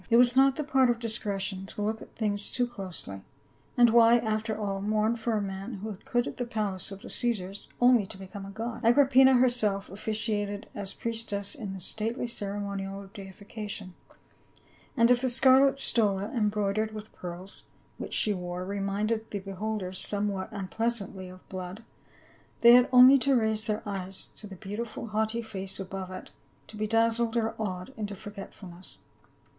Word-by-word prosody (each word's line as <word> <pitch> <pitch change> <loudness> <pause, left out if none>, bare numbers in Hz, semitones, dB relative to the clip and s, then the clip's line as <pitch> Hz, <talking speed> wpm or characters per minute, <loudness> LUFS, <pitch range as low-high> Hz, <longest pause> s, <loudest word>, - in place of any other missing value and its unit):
It 230 - +5
was 245 0 +5
not 270 0 +5
the 305 - -2
part 270 -3 +3
of 240 - +2
discretion 200 -4 -3
to 205 - -5
look 220 +1 -2
at - - -13
things 205 -2 -1
too 245 - +1
closely, 185 - -7 0.6
and 240 -2 +6
why, 235 0 +7
after 220 -1 -1
all, 200 -2 -3
mourn 215 +2 +1
for 230 0 -2
a 215 - +1
man 195 +4 -5
who 210 +3 -5
had 200 0 -11
quitted 240 0 -1
the 245 - -3
palace 205 -5 -3
of 195 +1 -9
the - - -9
Caesars 200 -5 -2
only 245 -5 +5
to - - -8
become 195 +1 -9
a 195 - -8
god? 225 +3 -5
Agrippina 265 +2 +6
herself 220 -7 +2
officiated 210 0 -2
as 200 -1 -4
priestess 220 -3 -2
in 200 -4 -6
the - - -7
stately 220 +7 -3
ceremonial 200 -3 -4
of 195 - -16
deification; 205 -1 -8 1.0
and 235 +1 +5
if 245 0 +4
the 260 - +1
scarlet 265 +2 +5
stola 205 -6 +2
em 215 -4 +2
broidered 210 +1 -1
with 215 0 -9
pearls, 180 +2 -9 0.3
which - - -4
she 210 - +2
wore, 180 -1 -5
reminded 205 +3 -2
the 205 - -3
beholders 195 -1 -4
somewhat 200 -2 -2
unpleasantly 200 -1 -3
of 185 0 -14
blood, 185 +3 -7 0.8
they 235 - +9
had 245 0 +6
only 255 +2 +9
to 270 +1 +3
raise 220 -1 0
their 215 +1 -1
e}'es 195 -1 -4
to 210 - -10
the 195 - -9
beautiful 220 +4 -6
haughty 220 +2 -1
face 195 -3 -6
above 190 -1 -5
it 185 - -9 0.3
to - - -12
be 215 0 -2
dazzled 230 +1 +2
or 225 -1 0
awed 185 +1 -4
into 210 -2 -4
forgetfulness. 190 -2 -10
210 Hz, 170 wpm, -28 LUFS, 195-230 Hz, 1.0 s, they